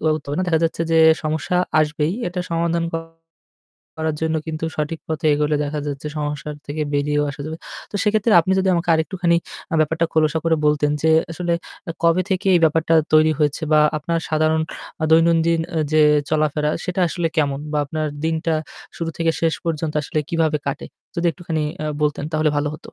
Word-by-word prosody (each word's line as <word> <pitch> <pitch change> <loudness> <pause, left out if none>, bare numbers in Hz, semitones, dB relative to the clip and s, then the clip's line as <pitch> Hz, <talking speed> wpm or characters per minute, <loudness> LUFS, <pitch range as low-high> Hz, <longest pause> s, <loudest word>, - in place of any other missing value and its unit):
হবে 155 -2 0
না। 185 - +1
দেখা 160 - +3
যাচ্ছে 165 0 -1
যে - - +4 0.3
সমস্যা 155 +3 -1 0.2
আসবেই, 150 +2 0 0.2
এটা 180 +1 -4
সমাধান 170 0 0 1.1
করার 160 -1 -1
জন্য 160 0 0
কিন্তু 160 0 -4
সঠিক 155 +1 -3
পথে 160 0 -2
এগোলে 150 0 +1
দেখা 150 +1 -3
যাচ্ছে 145 0 -5
সমস্যার 150 0 -3
থেকে 150 +2 -3
বেরিয়েও 145 +1 +1
আসা 140 - -10
যাবে। 160 +1 -5 0.3
তো - - -20
সেক্ষেত্রে 215 +1 +2
আপনি 185 +3 -1
যদি 190 - 0
আমাকে 170 0 -2
আরেকটুখানি 170 +1 +1 0.3
অ্যা 165 - -1
ব্যাপারটা 160 +2 +1
খোলসা 155 0 +2
করে 165 -1 +3
বলতেন 150 0 +2
যে 160 - +4 0.2
আসলে 175 +1 -2 0.3
অ্যা 165 - -3
কবে 170 +2 +4
থেকে 190 0 -1
এই 175 - +4
ব্যাপারটা 160 +1 +2 0.2
তৈরি 155 0 +5
হয়েছে 150 +1 0
বা 155 - +6 0.2
আপনার 165 +3 -1
সাধারণ 155 0 +2 0.4
আ - - +3
দৈনন্দিন 165 0 +4
অ্যা 160 - -1
যে 155 - +5 0.3
চলাফেরা 150 -1 +1
সেটা 180 0 -2
আসলে 170 0 -2
কেমন 140 -3 +1
বা 150 - +1
আপনার 155 +2 -2 0.2
দিনটা 160 0 0 0.4
শুরু 165 -1 -3
থেকে 165 -1 +2
শেষ 165 -1 +2
পর্যন্ত 160 -2 -2
আসলে 155 - -3
কিভাবে 160 -3 +1
কাটে? 140 0 -3 0.3
যদি 170 0 0
একটুখানি 165 -2 -3 0.2
আ - - -2 0.2
বলতেন 150 -1 0
তাহলে 155 -1 +2
ভালো 145 0 -1
হতো। - - -15
160 Hz, 185 wpm, -21 LUFS, 150-165 Hz, 1.1 s, বা